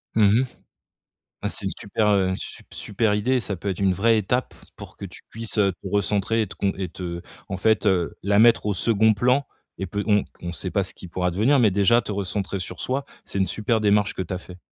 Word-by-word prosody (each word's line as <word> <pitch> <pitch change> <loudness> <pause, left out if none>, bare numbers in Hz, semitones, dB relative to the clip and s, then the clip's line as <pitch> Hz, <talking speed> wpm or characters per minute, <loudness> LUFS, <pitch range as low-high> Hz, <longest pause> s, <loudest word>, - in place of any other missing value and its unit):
Mmh 110 +2 +5
mh. - - 0 1.0
Ah - - 0
c'est - - -4
une - - 0
super, 105 +1 0
heu, 95 -2 +3
sup - - -8
super 105 0 0
idée. 125 +5 +1
Ça 100 -2 -3
peut 95 +4 -5
être 95 - -2
une 95 -1 +3
vraie 110 +5 +3
étape 125 +5 -1 0.2
pour - - -11
que - - -8
tu - - -9
puisses, 115 0 -4
heu, 100 -2 +4
te 90 - -23
recentrer 105 +3 +1
et - - -2
te 95 - -11
con 100 -1 0
et 95 -1 -3
te 85 0 -6 0.3
en 100 - -3
fait, 110 +3 +2
heu, 90 -4 +1
la 100 +1 +2
mettre 115 -1 +5
au 105 - +1
2d 110 +3 +3
plan 125 +6 +2 0.3
et 95 - -3
pe 100 +3 -3
on 105 -2 +3 0.2
on 85 0 -5
sait 80 - -4
pas - - +1
ce - - -6
qui 90 - -11
pourra 90 +1 -1
devenir, 110 +11 +3
mais 115 -5 +5
déjà 100 +5 +4
te - - -7
recentrer 100 0 -2
sur 90 0 -6
soi, 135 +2 -1 0.2
c'est - - -4
une 95 - +2
super 110 +2 0
démarche 105 -1 +2
que - - -2
tu 90 - -7
as - - -3
fait. 90 0 -12
100 Hz, 245 wpm, -24 LUFS, 95-110 Hz, 1.0 s, Mmh